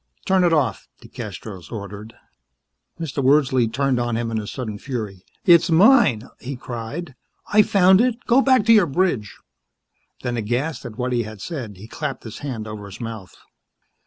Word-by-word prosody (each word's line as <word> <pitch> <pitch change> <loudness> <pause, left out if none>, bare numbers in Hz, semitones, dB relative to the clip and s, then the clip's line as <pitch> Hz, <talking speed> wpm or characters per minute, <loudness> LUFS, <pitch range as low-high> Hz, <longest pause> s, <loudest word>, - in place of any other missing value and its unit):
"Turn 190 -1 +3
it 175 - +3
off," 145 -8 0 0.2
DeCastros 95 -7 -8
ordered. 105 +1 -8 0.8
Mr. 145 -4 -3
Wordsley 130 -3 +3
turned 135 0 +1
on 120 -1 -1
him 115 -1 -2
in 110 - -1
a 105 - -6
sudden 110 -5 -5
fury. 110 -8 -5 0.2
"It's 170 -2 +6
mine," 165 - +5
he 135 +2 -6
cried. 125 +6 -6 0.4
"I 210 - +8
found 190 -1 +5
it! 245 -2 +1
Go 250 +3 +5
back 260 -6 +3
to 230 - +6
your 205 -6 +5
bridge." 135 - -1 0.9
Then, 120 -1 -2
aghast 125 +6 -2
at 110 -2 -11
what 125 0 -1
he 120 - +1
had 110 -2 -8
said, 120 - -6
he 105 +4 -11
clapped - - -5
his 110 - -8
hand 120 -7 -5
over 105 -1 -7
his 100 - -11
mouth. 110 -6 -7
125 Hz, 170 wpm, -22 LUFS, 110-170 Hz, 0.9 s, I